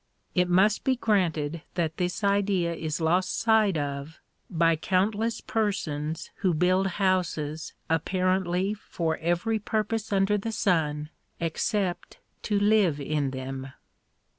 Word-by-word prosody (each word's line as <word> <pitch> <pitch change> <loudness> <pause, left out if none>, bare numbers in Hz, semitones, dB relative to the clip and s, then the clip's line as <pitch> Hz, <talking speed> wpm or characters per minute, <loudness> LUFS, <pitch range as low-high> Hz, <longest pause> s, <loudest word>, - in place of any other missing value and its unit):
It 180 -1 +2
must 195 +4 +3
be 265 - +2
granted 170 -9 0
that 165 -3 -1
this 180 +4 -2
idea 200 -4 +2
is 160 -1 -3
lost 175 +3 +1
sight 220 -5 +3
of 145 +1 -4 0.3
by 165 -1 +3
countless 205 +7 0
persons 165 -10 -2
who 185 -4 +1
build 185 +4 +3
houses 170 -6 0
apparently 185 +3 +1
for 165 -6 -3
every 175 +7 0
purpose 215 +1 -2
under 200 +1 +2
the 225 +3 -3
sun 155 -7 0 0.3
except 175 +3 -2 0.2
to 205 -1 0
live 205 -7 +3
in 145 0 -1
them. 130 0 -6
180 Hz, 120 wpm, -27 LUFS, 160-205 Hz, 0.3 s, must